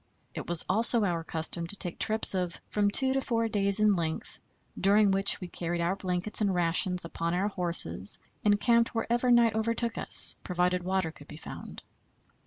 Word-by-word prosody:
It -, -, -7 dB
was 175 Hz, -2 st, +2 dB
also 225 Hz, +3 st, +4 dB
our 170 Hz, -3 st, -2 dB
custom 165 Hz, +1 st, -2 dB
to 205 Hz, -, 0 dB
take 180 Hz, -3 st, -2 dB
trips 220 Hz, -1 st, +2 dB
of 180 Hz, -2 st, -3 dB
from 205 Hz, -1 st, 0 dB
two 265 Hz, +5 st, +3 dB
to 270 Hz, -, -1 dB
four 230 Hz, -3 st, -1 dB
days 200 Hz, -1 st, 0 dB
in 210 Hz, -1 st, +3 dB
length, 160 Hz, -2 st, -5 dB, 0.4 s
during 200 Hz, +1 st, +2 dB
which 195 Hz, +1 st, +2 dB
we 180 Hz, -, -7 dB
carried 175 Hz, 0 st, -5 dB
our 170 Hz, +3 st, -1 dB
blankets 185 Hz, +2 st, -4 dB
and 200 Hz, -2 st, +1 dB
rations 175 Hz, +1 st, 0 dB
upon 170 Hz, 0 st, -4 dB
our 195 Hz, +3 st, -1 dB
horses 170 Hz, -, +1 dB, 0.3 s
and 205 Hz, -1 st, +2 dB
camped 235 Hz, 0 st, +1 dB
wherever 240 Hz, +2 st, -1 dB
night 235 Hz, -2 st, +4 dB
overtook 230 Hz, +1 st, -2 dB
us, -, -, +4 dB
provided 180 Hz, 0 st, -1 dB
water 185 Hz, -2 st, -2 dB
could 145 Hz, -2 st, -16 dB
be -, -, -11 dB
found. -, -, -10 dB
195 Hz, 185 wpm, -28 LUFS, 175-220 Hz, 0.4 s, also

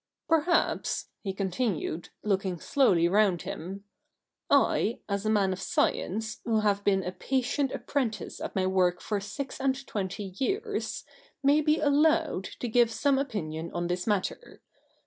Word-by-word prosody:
'Perhaps,' 330 Hz, +1 st, +1 dB
he 195 Hz, -, -2 dB
continued, 190 Hz, -3 st, -2 dB
looking 190 Hz, -4 st, 0 dB
slowly 180 Hz, -, +3 dB
round 195 Hz, -2 st, +3 dB
him, 190 Hz, +4 st, -6 dB, 0.3 s
' -, -, -60 dB
I, 225 Hz, -, +3 dB
as 200 Hz, +1 st, -2 dB
a -, -, +2 dB
man 200 Hz, -3 st, +3 dB
of 185 Hz, -, -7 dB
science, 215 Hz, +3 st, -1 dB
who 225 Hz, -2 st, +1 dB
have 205 Hz, -1 st, +1 dB
been 195 Hz, -2 st, +2 dB
a 180 Hz, -, -3 dB
patient 265 Hz, +7 st, -1 dB
ap -, -, -6 dB
prentice 225 Hz, -9 st, -2 dB
at -, -, -5 dB
my 190 Hz, -1 st, +1 dB
work 185 Hz, -1 st, +2 dB
for 210 Hz, -2 st, -2 dB
six 260 Hz, +9 st, -6 dB
and 270 Hz, 0 st, 0 dB
twenty 195 Hz, -2 st, -4 dB
years, 410 Hz, -, -2 dB, 0.4 s
may 285 Hz, +2 st, +5 dB
be 305 Hz, +1 st, +2 dB
allowed 300 Hz, -, +3 dB, 0.2 s
to 245 Hz, -, -1 dB
give 235 Hz, 0 st, +4 dB
some 270 Hz, +5 st, +2 dB
opinion 170 Hz, -, -3 dB
on 175 Hz, 0 st, -1 dB
this 180 Hz, +2 st, -2 dB
matter. 205 Hz, -, -2 dB
210 Hz, 155 wpm, -28 LUFS, 190-270 Hz, 0.4 s, may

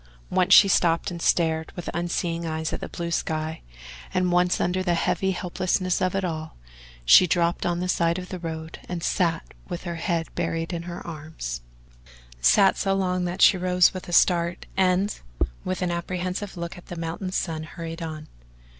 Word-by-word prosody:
Once 185 Hz, +1 st, +2 dB
she 200 Hz, -, +9 dB
stopped 170 Hz, -2 st, +2 dB
and 170 Hz, -1 st, -6 dB
stared 160 Hz, -2 st, +1 dB
with 175 Hz, -, -7 dB
unseeing 170 Hz, 0 st, -2 dB
eyes 160 Hz, -1 st, -3 dB
at -, -, -2 dB
the -, -, -6 dB
blue 170 Hz, 0 st, -4 dB
sky, 160 Hz, -1 st, -2 dB, 0.5 s
and 185 Hz, -1 st, +1 dB
once 180 Hz, 0 st, +3 dB
under 180 Hz, +1 st, 0 dB
the 175 Hz, -2 st, +1 dB
heavy 190 Hz, +3 st, 0 dB
helplessness 185 Hz, 0 st, -1 dB
of 185 Hz, 0 st, +1 dB
it 195 Hz, -1 st, 0 dB
all 160 Hz, -2 st, -5 dB, 0.5 s
she 180 Hz, -, +8 dB
dropped 170 Hz, 0 st, +1 dB
on 175 Hz, 0 st, 0 dB
the 180 Hz, -, -1 dB
side 170 Hz, -2 st, +1 dB
of 180 Hz, -1 st, -7 dB
the 185 Hz, -, -5 dB
road 160 Hz, -1 st, -6 dB
and 175 Hz, -2 st, -4 dB
sat 170 Hz, -4 st, 0 dB, 0.2 s
with 175 Hz, -1 st, -5 dB
her 170 Hz, -2 st, -4 dB
head 165 Hz, -1 st, -1 dB
buried 165 Hz, 0 st, -2 dB
in 170 Hz, -, -3 dB
her 175 Hz, +1 st, -7 dB
arms 155 Hz, -, -6 dB, 0.8 s
sat 130 Hz, -, +5 dB
so 195 Hz, -1 st, +1 dB
long 185 Hz, -2 st, 0 dB
that 180 Hz, +2 st, 0 dB
she 190 Hz, -, +7 dB
rose 180 Hz, 0 st, +4 dB
with 185 Hz, -1 st, -7 dB
a -, -, -5 dB
start 170 Hz, 0 st, +3 dB
and, 190 Hz, +2 st, +2 dB, 0.4 s
with 185 Hz, 0 st, -2 dB
an 175 Hz, -, 0 dB
apprehensive 180 Hz, +3 st, -3 dB
look 170 Hz, +1 st, -5 dB
at -, -, -18 dB
the 175 Hz, -, -6 dB
mounting 165 Hz, +3 st, -4 dB
sun, 165 Hz, -3 st, -2 dB
hurried 165 Hz, +1 st, -7 dB
on. 155 Hz, -2 st, -6 dB
175 Hz, 185 wpm, -25 LUFS, 165-185 Hz, 0.8 s, she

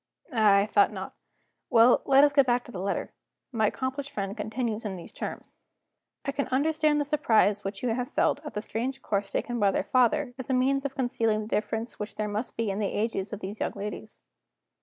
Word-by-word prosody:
Ah, 215 Hz, -4 st, +5 dB
I 200 Hz, 0 st, +4 dB
thought 205 Hz, -1 st, +3 dB
not. -, -, -6 dB, 0.6 s
Well, 240 Hz, -1 st, +6 dB
let 275 Hz, +1 st, +6 dB
us 290 Hz, -1 st, +4 dB
get 275 Hz, -2 st, +5 dB
back 245 Hz, 0 st, +2 dB
to 245 Hz, -, -12 dB
the 190 Hz, -, -6 dB
letter. 195 Hz, -, -2 dB, 0.4 s
My 220 Hz, -3 st, +2 dB
accomplished 265 Hz, +4 st, -3 dB
friend 200 Hz, -7 st, -4 dB
continues 220 Hz, +1 st, -3 dB
in 205 Hz, -3 st, -4 dB
these 175 Hz, -, -10 dB
terms: -, -, -7 dB, 0.7 s
"'I 280 Hz, -, 0 dB
can 280 Hz, 0 st, -2 dB
understand 300 Hz, +2 st, +2 dB
the 290 Hz, -, 0 dB
surprise 220 Hz, -8 st, +2 dB
which 195 Hz, +2 st, -5 dB
you 250 Hz, -, +1 dB
have 245 Hz, +2 st, -1 dB
felt -, -, +1 dB
at 300 Hz, -, -8 dB
the 210 Hz, -, -2 dB
strange 265 Hz, +4 st, -3 dB
course 200 Hz, -1 st, -1 dB
taken 240 Hz, +3 st, -2 dB
by 200 Hz, -2 st, +4 dB
their 195 Hz, -, 0 dB
father, 250 Hz, +5 st, +2 dB
as 260 Hz, -, -6 dB
a -, -, +2 dB
means 270 Hz, +2 st, +2 dB
of 275 Hz, -, -3 dB
concealing 225 Hz, -4 st, +1 dB
the 210 Hz, -, -6 dB
difference 220 Hz, +2 st, -2 dB
which 210 Hz, 0 st, -5 dB
there 215 Hz, -, -2 dB
must 210 Hz, +4 st, -4 dB
be 225 Hz, -3 st, 0 dB
in 195 Hz, -, -3 dB
the 205 Hz, -, +1 dB
ages 210 Hz, -2 st, -2 dB
of 210 Hz, -1 st, -6 dB
these 200 Hz, +3 st, -6 dB
young -, -, -1 dB
ladies. 210 Hz, +1 st, -7 dB
230 Hz, 220 wpm, -27 LUFS, 210-265 Hz, 0.7 s, Well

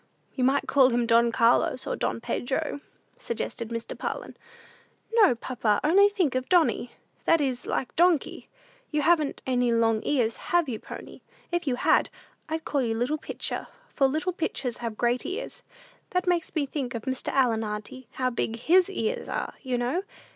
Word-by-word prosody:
"You 255 Hz, -, -1 dB
might 270 Hz, +2 st, +2 dB
call 270 Hz, -2 st, +5 dB
him 240 Hz, -1 st, +1 dB
Don 235 Hz, 0 st, +4 dB
Carlos, 235 Hz, +2 st, +2 dB
or -, -, -2 dB
Don -, -, -2 dB
Pedro," 280 Hz, +5 st, -2 dB, 0.4 s
suggested 235 Hz, -, -4 dB
Mr. 230 Hz, -1 st, -5 dB
Parlin. -, -, -5 dB, 0.8 s
"No, 415 Hz, -, +5 dB
papa; 225 Hz, -3 st, 0 dB
only 395 Hz, +7 st, +6 dB
think 370 Hz, -9 st, 0 dB
of 255 Hz, 0 st, -2 dB
Donny: 335 Hz, -8 st, +2 dB, 0.3 s
that 330 Hz, -, +4 dB
is 260 Hz, -4 st, -2 dB
like 265 Hz, -, -2 dB
Donkey! 345 Hz, -3 st, +2 dB, 0.4 s
You 300 Hz, -2 st, 0 dB
haven't 310 Hz, -2 st, +2 dB
any 250 Hz, -2 st, +1 dB
long 225 Hz, -1 st, +2 dB
ears, 240 Hz, -6 st, +1 dB
have 345 Hz, -3 st, +1 dB
you, 230 Hz, -4 st, -3 dB
pony? -, -, -10 dB, 0.3 s
If 345 Hz, -2 st, -1 dB
you 255 Hz, -, +2 dB
had, -, -, +3 dB, 0.4 s
I'd 320 Hz, 0 st, -3 dB
call 285 Hz, -, 0 dB
you 230 Hz, -3 st, 0 dB
Little 250 Hz, +7 st, -1 dB
Pitcher, -, -, -4 dB, 0.3 s
for 275 Hz, -, +3 dB
'little 315 Hz, +7 st, -1 dB
pitchers 270 Hz, -8 st, -2 dB
have 230 Hz, -2 st, -5 dB
great 240 Hz, +1 st, +1 dB
ears.' 445 Hz, +7 st, -5 dB, 0.5 s
That 365 Hz, 0 st, 0 dB
makes 350 Hz, -2 st, 0 dB
me 300 Hz, -3 st, +1 dB
think 270 Hz, -3 st, -4 dB
of 225 Hz, -, -4 dB
Mr. 260 Hz, -1 st, -3 dB
Allen, 235 Hz, -5 st, +2 dB
auntie. 215 Hz, +4 st, -6 dB
How 255 Hz, -1 st, 0 dB
big 230 Hz, -1 st, -2 dB
his 350 Hz, +10 st, +4 dB
ears 455 Hz, +5 st, -2 dB
are, -, -, -3 dB
you 255 Hz, -3 st, -1 dB
know? 245 Hz, +9 st, 0 dB
260 Hz, 175 wpm, -27 LUFS, 235-325 Hz, 0.8 s, only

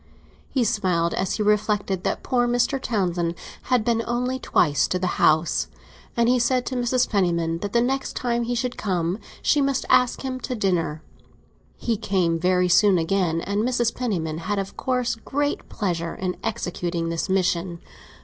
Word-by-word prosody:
He 260 Hz, -, +1 dB
smiled 180 Hz, -6 st, +1 dB
as 190 Hz, 0 st, -1 dB
he 215 Hz, -, -1 dB
reflected 205 Hz, -2 st, +1 dB
that -, -, -2 dB
poor 245 Hz, -2 st, +1 dB
Mr. 245 Hz, +3 st, +1 dB
Townsend 175 Hz, -6 st, -1 dB, 0.3 s
had 250 Hz, -4 st, +2 dB
been 230 Hz, -1 st, +2 dB
only 250 Hz, +2 st, -1 dB
twice 145 Hz, -, +2 dB
to 185 Hz, -, 0 dB
the 180 Hz, -1 st, -2 dB
house, 155 Hz, +2 st, +3 dB, 0.5 s
and 235 Hz, 0 st, +3 dB
he 250 Hz, +1 st, +4 dB
said 250 Hz, +1 st, +1 dB
to 260 Hz, -, -3 dB
Mrs. 245 Hz, 0 st, +1 dB
Penniman 170 Hz, -5 st, 0 dB
that 200 Hz, +2 st, -4 dB
the 235 Hz, +1 st, +3 dB
next 270 Hz, +2 st, -1 dB
time 240 Hz, -1 st, 0 dB
he 240 Hz, +1 st, -1 dB
should 245 Hz, +1 st, -2 dB
come 180 Hz, -1 st, -1 dB, 0.2 s
she 295 Hz, -, +3 dB
must 275 Hz, -1 st, 0 dB
ask 250 Hz, -1 st, +4 dB
him 260 Hz, -1 st, -3 dB
to 255 Hz, 0 st, -4 dB
dinner. 175 Hz, -7 st, -1 dB, 0.7 s
He 230 Hz, -2 st, -1 dB
came 175 Hz, -5 st, 0 dB
very 180 Hz, +1 st, +2 dB
soon 185 Hz, +2 st, +5 dB
again, 165 Hz, -1 st, +1 dB
and 200 Hz, +3 st, -1 dB
Mrs. 240 Hz, -1 st, +1 dB
Penniman 165 Hz, -11 st, -2 dB
had 205 Hz, +4 st, -2 dB
of 195 Hz, 0 st, -4 dB
course 250 Hz, -2 st, 0 dB
great 285 Hz, +5 st, -2 dB
pleasure 170 Hz, -4 st, -2 dB
in 185 Hz, -1 st, -3 dB
executing 175 Hz, -6 st, -2 dB
this 165 Hz, +2 st, -2 dB
mission. 180 Hz, -2 st, 0 dB
205 Hz, 170 wpm, -24 LUFS, 175-245 Hz, 0.7 s, soon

